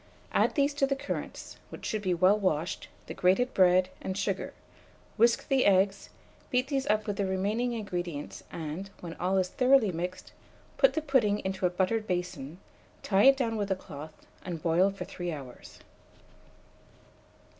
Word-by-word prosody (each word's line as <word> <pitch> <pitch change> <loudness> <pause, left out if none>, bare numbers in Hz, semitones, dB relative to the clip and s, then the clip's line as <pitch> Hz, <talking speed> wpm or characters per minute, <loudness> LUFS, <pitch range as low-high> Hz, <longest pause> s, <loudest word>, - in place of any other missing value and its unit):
add - - +3
to - - -18
these 285 0 +2
the 275 -1 +1
currants, 270 - -6
which - - -9
should 215 - -2
be 185 -3 -1
well 185 +3 +4
washed, 170 -4 -1 0.2
the - - -7
grated 190 +8 +2
bread, 185 0 +4
and 190 0 -4
sugar; 200 -1 -2 0.6
whisk 235 +1 +3
the 270 -2 +3
eggs, 195 0 +2 0.4
beat 255 +2 +1
these 270 -2 -1
up 215 0 +1
with 205 -2 -3
the 200 - 0
remaining 210 +6 0
ingredients, 175 -9 -5
and, 165 +5 -5
when 170 -2 -6
all 185 +2 +1
is 185 -1 +1
thoroughly 255 -2 +4
mixed, 180 +2 -5 0.4
put - - +4
the 315 - -2
pudding 255 -8 +2
into 190 -1 0
a - - -1
buttered 195 +5 0
basin, 175 -4 -3 0.5
tie 200 +2 +3
it 270 0 +7
down 230 -4 -1
with 205 -1 -2
a 190 - +2
cloth, 155 -3 -11 0.2
and 170 -4 -6
boil 175 +3 +3
for 195 - -6
3 175 -1 -5
hours. 135 -5 -10
195 Hz, 165 wpm, -29 LUFS, 180-230 Hz, 0.6 s, it